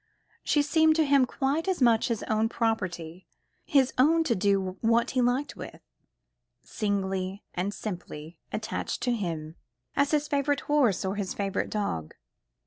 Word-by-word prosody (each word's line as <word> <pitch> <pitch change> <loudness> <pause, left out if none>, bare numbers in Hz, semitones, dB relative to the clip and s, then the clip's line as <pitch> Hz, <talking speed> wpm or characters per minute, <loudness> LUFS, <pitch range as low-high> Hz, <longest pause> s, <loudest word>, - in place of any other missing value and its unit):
She 295 - +2
seemed 315 +1 +4
to 320 -1 +3
him 275 -2 +4
quite 290 +7 -1
as 375 -2 0
much 235 -4 +4
his 230 -3 -2
own 220 +1 +1
property, 185 -7 -2 0.4
his 270 -3 +3
own 325 +5 +5
to 265 - +1
do 195 -2 0
what 230 +1 +2
he 255 - +1
liked 250 +4 0
with, - - -9 0.8
singly 195 -2 -2
and 185 +3 -2
simply 175 -6 -7
attached 215 0 -3
to 245 - +1
him, 165 -7 -4 0.4
as 280 0 +2
his 300 -1 +1
favourite 285 -1 0
horse 265 -11 +2
or 190 +2 -2
his 200 -3 -3
favourite 195 -1 -2
dog. 85 - -3
225 Hz, 150 wpm, -27 LUFS, 190-280 Hz, 0.8 s, own